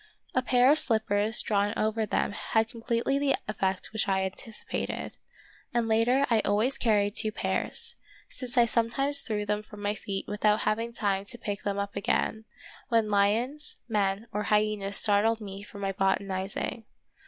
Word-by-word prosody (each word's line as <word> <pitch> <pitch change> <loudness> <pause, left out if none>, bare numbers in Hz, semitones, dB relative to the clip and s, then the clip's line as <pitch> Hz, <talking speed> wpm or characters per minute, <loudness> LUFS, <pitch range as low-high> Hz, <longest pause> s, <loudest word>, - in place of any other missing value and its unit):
A 255 - +2
pair 250 +1 +4
of 310 - +4
slippers 220 -2 +2
drawn 205 +1 +1
over 220 0 0
them - - 0
had 220 +2 0
completely 235 +3 0
the 280 -1 +2
effect 195 -2 -2
which 220 - 0
I 190 0 +2
anticipated, 210 +3 -5 0.6
and 235 -1 +2
later 235 +5 +3
I 230 -2 +3
always 215 +6 +1
carried 205 -3 +3
two 215 - 0
pairs, - - -2 0.3
since 255 -1 -2
I 240 - +7
sometimes 245 +5 +1
threw 210 -2 -2
them 210 0 0
from 210 -1 -11
my 205 0 +1
feet 195 -2 -4
without 210 +1 +2
having 230 +2 0
time 200 -3 -1
to 240 - -3
pick 205 -3 -4
them 200 -1 -2
up 200 0 -3
again, 220 +2 0 0.4
when 225 -2 +2
lions, 230 +9 +1
men, 205 -1 0
or 210 0 -2
hyenas 210 -1 +1
startled 215 +2 +3
me 200 -2 -7
from 205 0 -10
my 195 -1 0
botanizing. 195 +3 -1
215 Hz, 165 wpm, -28 LUFS, 200-230 Hz, 0.6 s, I